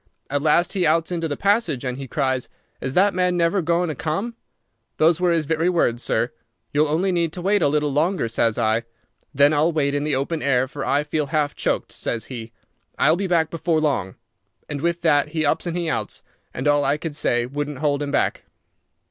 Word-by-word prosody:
At 145 0 0
last 170 +3 +3
he 190 -3 0
outs 165 +2 +2
into 165 -2 -1
the 145 - -4
passage, 195 - +1
and 125 -1 -2
he 135 - -6
cries, 130 -2 -1 0.3
'Is 130 0 -3
that 200 +2 +4
man 180 -1 +1
never 170 +3 +2
goin' 170 +2 +1
to - - -1
come?' 165 - -3 0.6
Those 165 +2 +3
were 180 -1 +3
his 165 -2 +1
very 160 +3 +1
words, 120 -9 +1
sir. - - 0 0.4
'You'll 150 +2 +3
only 170 +6 +1
need 170 -2 0
to 180 - -6
wait 200 +1 +2
a - - +4
little 150 0 +1
longer,' 160 -1 +1
says 115 -1 0
I. 110 -1 +2 0.5
'Then 145 +2 +5
I'll 155 +3 +3
wait 140 -3 0
in 145 0 0
the 150 -2 0
open 145 +4 -2
air, 130 -2 +2
for 135 0 -6
I 145 +2 +1
feel 150 0 -2
half 150 -1 0
choked,' - - -2
says 115 - -3
he. 115 -2 -7 0.5
'I'll - - +4
be 195 +2 -2
back 165 -3 +1
before 165 -1 0
long.' 135 -12 -1 0.5
And 145 -1 -5
with 170 +1 0
that 150 -3 +3
he 155 0 -1
ups 160 +4 0
and 170 0 -2
he 170 -1 -2
outs, 160 - -3 0.3
and 130 - -3
all 145 0 +4
I 140 +2 +2
could 155 -1 -5
say 120 -5 +1
wouldn't 145 +2 -4
hold 145 0 0
him 145 - -2
back." 145 - 0
155 Hz, 215 wpm, -22 LUFS, 140-170 Hz, 0.6 s, Then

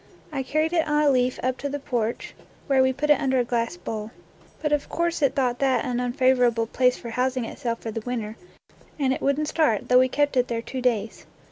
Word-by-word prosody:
I 275 -3 -2
carried 310 +5 0
it 325 -2 +2
on 300 0 +2
a 290 - +5
leaf 250 -1 +1
up 255 0 -1
to 285 - -3
the 285 - -3
porch, 240 -5 -3 0.3
where 270 -2 +3
wo 260 0 +3
put 300 +3 0
it 295 - +4
under 265 -1 +1
a 250 - +3
glass 235 -5 -2
bowl. 215 +4 -5 0.5
But 300 - -1
of 295 -1 0
course 340 -1 -1
it 275 -1 +2
thought 250 -3 0
that 265 -2 +2
an 245 -1 -1
unfavorable 250 -2 +2
place 250 +2 +2
for 235 - -8
housing 255 0 0
itself 230 -1 -4
for 225 - -4
the 225 - -4
winter, 225 -2 -4 0.6
and 270 -3 +1
it - - -5
would 280 +1 +1
n't 305 - -1
start, 295 -11 +1
though 250 0 +6
we 255 0 +3
kept 290 +1 +1
it 250 0 +3
there 230 -1 -3
two 260 +1 -5
days. 225 -4 -1
255 Hz, 235 wpm, -24 LUFS, 240-280 Hz, 0.6 s, though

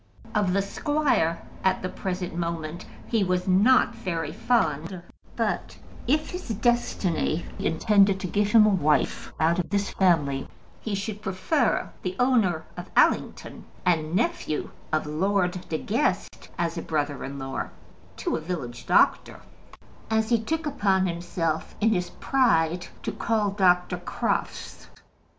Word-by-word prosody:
Of 205 -4 +1
the 200 0 +2
squire, 200 - 0 0.2
at 190 -1 +1
the - - 0
present 180 -3 -4
moment, 170 -1 -4 0.2
he 225 -4 +2
was 180 0 0
not 215 +6 +5
very 170 -8 -3
fond; 170 -6 0 0.3
but - - -2 0.3
if 300 +4 +1
his 360 -6 -7
destiny 205 -7 0
intended 195 +3 +3
to - - -3
give 205 +3 +1
him 220 -1 +7
a - - +5
wife 155 -7 +1
out 165 +3 +3
of 180 - -2
this 200 0 0
family, 150 -8 +2 0.3
he 215 -3 -3
should 205 +1 -4
prefer 195 - 0
the 185 0 -3
owner 215 -11 +2
of 175 0 -8
Allington - - +1 0.2
and 165 -2 +1
nephew 185 -7 -1 0.2
of 155 0 +1
Lord 180 +3 0
De 160 - 0
Guest 225 - -1
as 170 0 -1
a - - -4
brother 145 -3 -2
in 140 +1 -6
law 135 0 -4 0.5
to - - -1
a - - -3
village 145 -8 -5
doctor, - - +3 0.7
as 220 0 +1
he 230 -2 +3
took 320 +7 -2
upon 200 -10 +1
himself, 170 -2 -2
in 220 - +3
his 180 -5 0
pride, 175 -10 +1 0.2
to - - -2
call 215 -3 0
Dr. 180 -2 +3
Crofts. 175 - -3
185 Hz, 140 wpm, -26 LUFS, 165-215 Hz, 0.7 s, him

